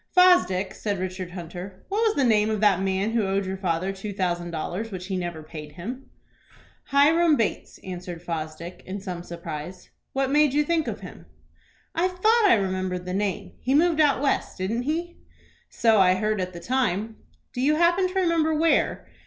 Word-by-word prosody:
"Fosdick," 205 Hz, -, +5 dB
said 205 Hz, -2 st, -3 dB
Richard 185 Hz, 0 st, -4 dB
Hunter, 180 Hz, +2 st, -8 dB
"what 405 Hz, +2 st, -1 dB
was 440 Hz, -2 st, +2 dB
the 280 Hz, -, +2 dB
name 215 Hz, -3 st, +3 dB
of 215 Hz, -1 st, -1 dB
that 200 Hz, -3 st, +4 dB
man 195 Hz, +2 st, 0 dB
who 230 Hz, -1 st, +1 dB
owed 195 Hz, 0 st, 0 dB
your 190 Hz, +1 st, -3 dB
father 185 Hz, 0 st, -1 dB
two 195 Hz, +2 st, -6 dB
thousand 175 Hz, -3 st, -2 dB
dollars, 175 Hz, +7 st, -4 dB
which 185 Hz, -3 st, -6 dB
he 190 Hz, 0 st, -3 dB
never 175 Hz, -3 st, -4 dB
paid 150 Hz, -1 st, -9 dB
him?" 240 Hz, -, -7 dB, 0.8 s
"Hiram 310 Hz, +3 st, +4 dB
Bates," 225 Hz, -6 st, -2 dB
answered 180 Hz, -2 st, -7 dB
Fosdick, 165 Hz, +1 st, -5 dB
in 195 Hz, +2 st, -4 dB
some 180 Hz, -3 st, -5 dB
surprise. 170 Hz, 0 st, -8 dB, 0.2 s
"What 270 Hz, 0 st, 0 dB
made 295 Hz, -1 st, +4 dB
you 295 Hz, -, +4 dB
think 320 Hz, -2 st, 0 dB
of 220 Hz, -, -4 dB
him?" 180 Hz, -, -11 dB, 0.7 s
"I 340 Hz, +3 st, +2 dB
thought 430 Hz, +5 st, +3 dB
I 395 Hz, -, +7 dB
remembered 185 Hz, -2 st, -2 dB
the 180 Hz, -, -4 dB
name. 195 Hz, -2 st, -2 dB
He 265 Hz, +2 st, 0 dB
moved 325 Hz, 0 st, +4 dB
out 285 Hz, -2 st, +3 dB
West, 280 Hz, -, 0 dB
didn't 210 Hz, +6 st, -1 dB
he?" 345 Hz, +2 st, -3 dB, 0.5 s
"So 225 Hz, -3 st, +3 dB
I 185 Hz, -1 st, +5 dB
heard 215 Hz, 0 st, 0 dB
at 185 Hz, 0 st, -4 dB
the 170 Hz, -, -7 dB
time." 220 Hz, -1 st, -1 dB, 0.4 s
"Do 250 Hz, -, -3 dB
you 295 Hz, +3 st, +3 dB
happen 345 Hz, +3 st, +3 dB
to 365 Hz, -, -8 dB
remember 330 Hz, -3 st, +2 dB
where? 325 Hz, +2 st, +2 dB
200 Hz, 185 wpm, -25 LUFS, 180-285 Hz, 0.8 s, I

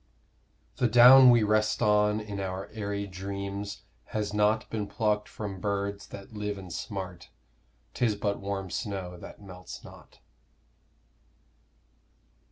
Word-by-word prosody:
The 125 Hz, -, +3 dB
down 125 Hz, +3 st, +9 dB
we 120 Hz, -2 st, +6 dB
rest 110 Hz, 0 st, +2 dB
on 105 Hz, 0 st, +3 dB
in 105 Hz, -2 st, -6 dB
our 95 Hz, 0 st, -4 dB
aëry 100 Hz, -1 st, -4 dB
dreams 100 Hz, +2 st, -5 dB, 0.2 s
Has 105 Hz, -1 st, -3 dB
not 105 Hz, +1 st, +2 dB
been 105 Hz, -2 st, -2 dB
plucked 105 Hz, -1 st, 0 dB
from 100 Hz, -4 st, -6 dB
birds 100 Hz, 0 st, -2 dB
that 100 Hz, +2 st, -11 dB
live 105 Hz, -1 st, -3 dB
and 95 Hz, -3 st, -8 dB
smart; 95 Hz, -2 st, -6 dB, 0.6 s
'Tis 115 Hz, -4 st, +1 dB
but 100 Hz, 0 st, -2 dB
warm 100 Hz, -2 st, -4 dB
snow, 95 Hz, -5 st, -4 dB
that 105 Hz, -, -11 dB
melts 90 Hz, -2 st, -10 dB
not. -, -, -15 dB
100 Hz, 125 wpm, -28 LUFS, 100-105 Hz, 0.6 s, down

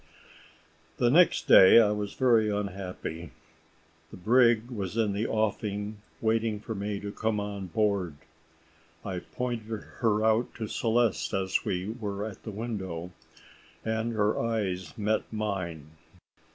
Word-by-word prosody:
The 120 Hz, -1 st, +3 dB
next 175 Hz, +5 st, +4 dB
day 95 Hz, +4 st, +9 dB
I 105 Hz, -3 st, +4 dB
was 105 Hz, -1 st, -3 dB
very 115 Hz, -5 st, +3 dB
unhappy. 95 Hz, -5 st, -4 dB, 0.8 s
The -, -, -11 dB
brig 120 Hz, +3 st, +3 dB
was 100 Hz, -2 st, -4 dB
in 110 Hz, -3 st, +1 dB
the 105 Hz, +3 st, -1 dB
offing 105 Hz, -1 st, -2 dB, 0.2 s
waiting 110 Hz, -1 st, +1 dB
for 110 Hz, +2 st, -6 dB
me 100 Hz, 0 st, -3 dB
to 100 Hz, 0 st, -5 dB
come 110 Hz, 0 st, -1 dB
on 100 Hz, -2 st, -5 dB
board. 100 Hz, -4 st, 0 dB, 0.9 s
I 95 Hz, -3 st, -3 dB
pointed 115 Hz, -1 st, -4 dB, 0.2 s
her 110 Hz, -2 st, +2 dB
out 110 Hz, +2 st, +2 dB
to 115 Hz, -, -4 dB
Celeste 115 Hz, -2 st, 0 dB
as 95 Hz, -1 st, 0 dB
we 90 Hz, +1 st, -2 dB
were 100 Hz, -1 st, -3 dB
at 110 Hz, -3 st, -8 dB
the -, -, -7 dB
window, 95 Hz, -6 st, -5 dB, 0.7 s
and 110 Hz, +1 st, -1 dB
her 105 Hz, -1 st, +1 dB
eyes 100 Hz, -7 st, -2 dB
met 110 Hz, +1 st, -1 dB
mine. 90 Hz, -8 st, -4 dB
105 Hz, 135 wpm, -28 LUFS, 100-110 Hz, 0.9 s, day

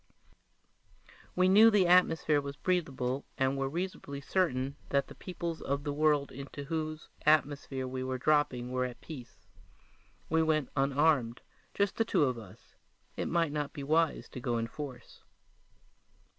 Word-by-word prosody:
We 185 Hz, 0 st, +4 dB
knew 205 Hz, +4 st, +7 dB
that 210 Hz, -, +3 dB
the 190 Hz, -, +4 dB
atmosphere 165 Hz, -4 st, +4 dB
was 140 Hz, 0 st, -6 dB
breathable 140 Hz, -7 st, -1 dB
and 135 Hz, 0 st, +1 dB
were 135 Hz, 0 st, -1 dB
reasonably 165 Hz, -3 st, -4 dB
certain 140 Hz, -4 st, 0 dB
that 140 Hz, 0 st, +2 dB
the -, -, -9 dB
peoples 170 Hz, -3 st, -5 dB
of 140 Hz, +1 st, -2 dB
the 145 Hz, -1 st, -2 dB
world 150 Hz, -2 st, +2 dB
into 140 Hz, +1 st, -8 dB
whose 155 Hz, +1 st, -4 dB
atmosphere 145 Hz, -3 st, +2 dB
we 130 Hz, 0 st, -4 dB
were 130 Hz, 0 st, -2 dB
dropping 130 Hz, -3 st, +1 dB
were 130 Hz, 0 st, 0 dB
at 125 Hz, -1 st, -5 dB
peace. 120 Hz, -, -11 dB, 0.8 s
We 160 Hz, 0 st, +2 dB
went 155 Hz, -4 st, +1 dB
unarmed, 135 Hz, -3 st, +2 dB, 0.3 s
just 200 Hz, -1 st, 0 dB
the 225 Hz, -, +3 dB
two 220 Hz, -, +2 dB
of 125 Hz, -4 st, 0 dB
us; 105 Hz, +1 st, -15 dB, 0.4 s
it -, -, -2 dB
might 165 Hz, -2 st, +1 dB
not 145 Hz, -1 st, -3 dB
be 145 Hz, -4 st, -6 dB
wise 160 Hz, +2 st, +1 dB
to -, -, -7 dB
go 120 Hz, -1 st, -1 dB
in 115 Hz, -, -1 dB
force. 125 Hz, 0 st, -9 dB
145 Hz, 160 wpm, -31 LUFS, 130-160 Hz, 0.8 s, knew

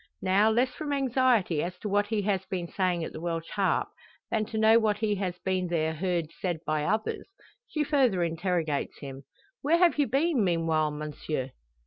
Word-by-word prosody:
Now, 195 Hz, +3 st, +4 dB
less 245 Hz, +4 st, +2 dB
from 295 Hz, +3 st, -5 dB
anxiety 250 Hz, -, +2 dB
as 180 Hz, +1 st, -4 dB
to 210 Hz, -, -5 dB
what 205 Hz, 0 st, +1 dB
he 210 Hz, -1 st, -1 dB
has 195 Hz, -2 st, 0 dB
been 180 Hz, -3 st, -3 dB
saying 180 Hz, -2 st, 0 dB
at -, -, -6 dB
the 155 Hz, -, -7 dB
Welsh 165 Hz, -1 st, -3 dB
Harp, 195 Hz, -2 st, +1 dB, 0.4 s
than 215 Hz, -1 st, +1 dB
to 220 Hz, -, -5 dB
know 220 Hz, +1 st, +6 dB
what 215 Hz, -2 st, +1 dB
he 210 Hz, -1 st, 0 dB
has 185 Hz, -2 st, -3 dB
there 175 Hz, -4 st, 0 dB
heard 170 Hz, -1 st, -1 dB
said 175 Hz, -3 st, -1 dB
by 155 Hz, -1 st, 0 dB
others, 215 Hz, +4 st, -1 dB, 0.4 s
she 305 Hz, -, -1 dB
further 260 Hz, -, +2 dB
interrogates 165 Hz, -3 st, -1 dB
him: 135 Hz, -1 st, -9 dB, 0.4 s
"Where 310 Hz, +4 st, +3 dB
have 345 Hz, -3 st, +4 dB
you 285 Hz, -, +3 dB
been 275 Hz, 0 st, +2 dB
meanwhile, 165 Hz, -3 st, +1 dB
monsieur?" 150 Hz, -2 st, -4 dB
190 Hz, 180 wpm, -28 LUFS, 165-220 Hz, 0.4 s, know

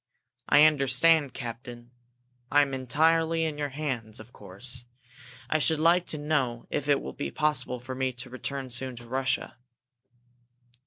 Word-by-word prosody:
"I 145 Hz, -, +7 dB
understand, 145 Hz, 0 st, +4 dB
captain. 120 Hz, 0 st, -8 dB, 0.6 s
I 145 Hz, +1 st, +6 dB
am 140 Hz, -1 st, -4 dB
entirely 160 Hz, +6 st, +2 dB
in 155 Hz, -2 st, -3 dB
your 145 Hz, -1 st, -1 dB
hands, 130 Hz, -7 st, -4 dB
of 110 Hz, +2 st, -13 dB
course. 120 Hz, +6 st, -4 dB, 0.6 s
I 155 Hz, -, +1 dB
should 150 Hz, +3 st, +1 dB
like 170 Hz, +3 st, +4 dB
to 155 Hz, -, -2 dB
know 145 Hz, -6 st, -1 dB
if 145 Hz, 0 st, -2 dB
it 140 Hz, -, +4 dB
will 65 Hz, -, -6 dB
be 70 Hz, -, -4 dB
possible 130 Hz, -, 0 dB
for 130 Hz, +2 st, -7 dB
me 130 Hz, 0 st, -1 dB
to 125 Hz, +1 st, -8 dB
return 130 Hz, 0 st, -5 dB
soon 130 Hz, +1 st, -4 dB
to 120 Hz, 0 st, -11 dB
Russia?" 130 Hz, +1 st, -1 dB
130 Hz, 155 wpm, -28 LUFS, 120-150 Hz, 0.6 s, I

